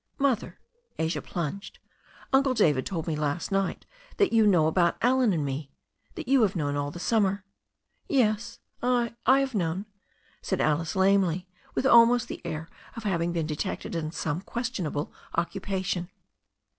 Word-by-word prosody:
"Mother," 270 -5 0 0.4
Asia 160 -1 -1
plunged, 175 +4 -5 0.6
"Uncle 265 -1 +4
David 150 - +3
told 170 -5 -3
me 160 - -1
last 150 +5 -2
night 195 -1 -1 0.3
that 405 - +3
you 220 -2 +5
know 175 -6 +4
about 170 +2 +2
Allen 250 -2 +4
and 155 -5 0
me 140 +1 -4 0.2
— - - -38
^that 335 -3 -6
you 270 0 +4
have 200 -3 +2
known 145 -4 -1
all 145 0 -1
the 160 - -9
summer." 200 -1 +1 0.6
"Yes, 230 -3 +1 0.2
I 245 -1 +1
— - - -43
I - - +3
have 270 -1 -2
known," 185 0 -1 0.6
said 190 - -2
Alice 155 +1 +1
lamely, 190 -2 +3 0.3
with - - 0
almost 240 -1 +6
the - - -6
air 160 -1 -4 0.3
of 230 - -7
having 175 -4 0
been 165 -2 -1
detected 155 +6 -4
in 160 -2 -2
some 160 0 -3
questionable 195 - -3 0.2
occu 175 +3 -1
pation. 185 -2 -2
190 Hz, 165 wpm, -27 LUFS, 160-230 Hz, 0.6 s, almost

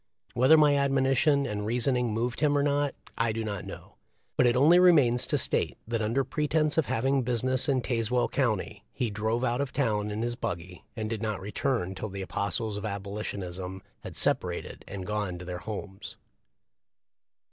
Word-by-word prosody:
Whether 130 +6 +6
my 150 -1 +5
admoni 135 -1 +2
tion 140 -1 +3
and 105 -4 -3
reasoning 125 +2 +1
moved 120 +2 -2
him 145 -1 +3
or 140 - +2
not 145 0 +1 0.2
I 115 0 +2
do 110 +1 -3
not 100 -3 -4
know, - - -10 0.4
but 125 - +4
it 120 - +3
only 155 +7 +6
remains 145 -10 +5
to - - +1
state - - +1
that 115 -1 -1
under 115 +6 +1
pre 150 +3 -2
tence 155 0 +1
of 160 - +2
having 135 +4 +1
business 125 +2 +1
in 130 -3 +1
Tazewell 120 0 0
county 110 -5 -1
he 120 -5 -2
drove 110 +4 -1
out 120 +1 0
of 140 - -3
town 105 -6 0
in 105 +2 -3
his 120 0 -1
buggy, 90 -6 -5
and 110 -1 -3
did 110 -1 -4
not 110 -2 -2
return 105 0 -2
till 105 +3 -5
the 95 0 -5
apostles 100 +3 -2
of 105 - -6
Abolitionism 100 -2 -5 0.2
had - - -9
separated - - -1
and 95 -1 -6
gone 105 -3 -2
to 90 - -9
their 90 0 -5
homes. 100 -1 -7
115 Hz, 185 wpm, -28 LUFS, 105-135 Hz, 0.4 s, Whether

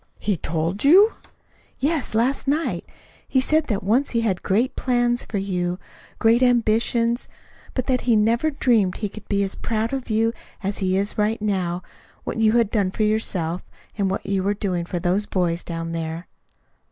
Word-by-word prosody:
"He 205 - 0
TOLD 165 +4 -2
you!" 385 +10 +7 0.6
"Yes 290 -5 -1
last 255 +5 +1
night. 300 +4 -1 0.4
He 260 - +2
said 305 +4 +2
that 205 -6 -1
once 235 +9 +2
he 230 - 0
had 195 -6 0
great 225 +7 +1
plans 245 -1 +1
for 210 - -4
you, 180 -2 -1 0.4
great 230 +2 +4
ambitions, 235 0 +2 0.5
but 255 - -1
that 255 -2 +1
he 240 -2 +3
never 230 +8 +2
dreamed 230 -10 +2
he 210 - -3
could 215 +1 -12
be 200 -1 +2
as 195 - -2
proud 225 +1 -2
of 265 -2 -4
you 225 +1 +2 0.3
as 195 +1 -2
he 185 -1 +1
is 200 +2 -2
right 215 +2 +1
now 185 -4 -1 0.4
what - - -4
you 220 -1 +4
had 230 -3 +3
done 200 -4 +1
for 215 - -1
yourself, 185 -6 -1 0.3
and 200 -2 0
what 190 - -3
you 195 -1 0
were 200 +2 0
doing 185 -4 -2
for 175 - -4
those 185 +4 0
boys 175 -2 0
down 165 -1 -5
there." 165 +1 -4
215 Hz, 180 wpm, -23 LUFS, 185-240 Hz, 0.6 s, you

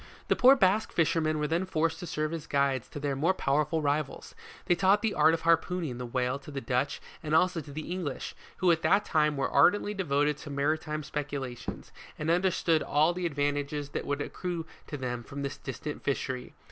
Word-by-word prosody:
The - - +4
poor 260 +2 +7
Basque 210 -2 +2
fishermen 160 -1 +1
were 150 - 0
then 170 +4 0
forced 165 -2 0
to 175 - -6
serve 155 0 -2
as 165 -2 -5
guides 140 -3 +1
to - - -7
their 145 -1 -1
more 165 +8 +2
powerful 150 +2 +1
rivals; 145 -1 -2 0.3
they 180 - +4
taught 195 +4 +3
the 220 -2 +1
art 160 +2 +5
of 165 - -6
harpooning 165 -4 +1
the 125 - -4
whale 125 +2 -1
to 140 - -12
the 140 -2 -4
Dutch 135 +1 -1 0.2
and 155 -1 0
also 180 0 +3
to 145 - -11
the 155 +3 -6
English, 175 -7 -4 0.2
who 185 -2 +4
at 165 -1 +2
that 205 +1 +3
time, 150 -3 +2
were 135 - +1
ardently 205 +8 +4
devoted 150 -6 +1
to 150 - -9
maritime 155 +2 -1
speculations, 140 -5 -5 0.3
and 155 +2 0
understood 170 -2 +2
all 155 +4 +2
the 180 0 -1
advantages 145 -1 -2
that - - -4
would 145 0 -1
accrue 175 -1 -4 0.2
to 145 - -5
them 125 -2 -3
from 140 +3 -7
this 140 - -4
distant 145 +2 -6
fishery. 130 -2 -3
150 Hz, 200 wpm, -29 LUFS, 140-170 Hz, 0.3 s, poor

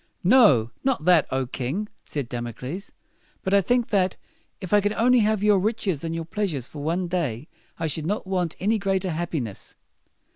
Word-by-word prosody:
"No, 180 - +5
not 260 - 0
that, 175 -4 +5
O 130 0 0
king!" 135 - -3 0.2
said 145 -5 -4
Dam 120 0 -4
o 120 - -6
cles; 145 - -7 0.5
"but 190 - -1
I 200 - +6
think, 245 +4 +1
that, 190 -3 +1 0.4
if 185 -2 -5
I 205 - +6
could 205 +1 0
only 245 +3 +4
have 215 -2 +1
your 210 -2 +5
riches 200 -6 -1
and 165 0 -3
your 165 0 -4
pleas 200 +1 -2
ures 125 -3 -5
for 145 - -9
one 170 +4 -1
day, 155 -7 -2 0.3
I - - -2
should 155 0 -2
not 205 +2 -2
want 180 -4 -1
any 215 +3 +1
greater 195 -2 0
hap 170 +2 -3
pi - - +1
ness." 115 -8 -6
180 Hz, 210 wpm, -24 LUFS, 150-205 Hz, 0.5 s, I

